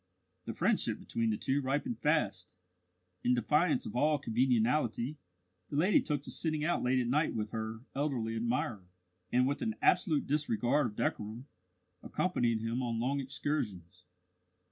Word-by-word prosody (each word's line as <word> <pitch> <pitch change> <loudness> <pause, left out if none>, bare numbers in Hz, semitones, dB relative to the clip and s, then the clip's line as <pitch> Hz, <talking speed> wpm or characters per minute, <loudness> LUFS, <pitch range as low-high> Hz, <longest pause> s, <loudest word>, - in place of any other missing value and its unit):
The - - -5
friendship - - +1
between 115 -1 -2
the 105 - 0
two 140 +6 0
ripened 140 - -1
fast. 100 - 0 0.7
In 125 +1 +3
defiance 150 +5 +2
of - - -6
all 150 +4 +3
conventionality, 125 +1 +1 0.5
the - - -5
lady 180 +8 +4
took 145 -3 -2
to - - -7
sitting 155 -2 -1
out 175 - +1
late 125 +1 +2
at 125 - +1
night 150 +6 +1
with 105 -1 -2
her 110 0 -4
elderly 130 -6 -1
admirer, 115 -4 -1 0.4
and, 125 +1 +4
with 140 +2 -1
an 225 -1 -1
absolute 170 -5 +3
disregard 140 -1 +1
of 105 - -8
decorum, 110 +5 -2 0.6
accompanied 120 -11 0
him 115 +3 -1
on 115 -2 -1
long 135 +4 0
excursions. 105 - -3
125 Hz, 150 wpm, -32 LUFS, 115-150 Hz, 0.7 s, lady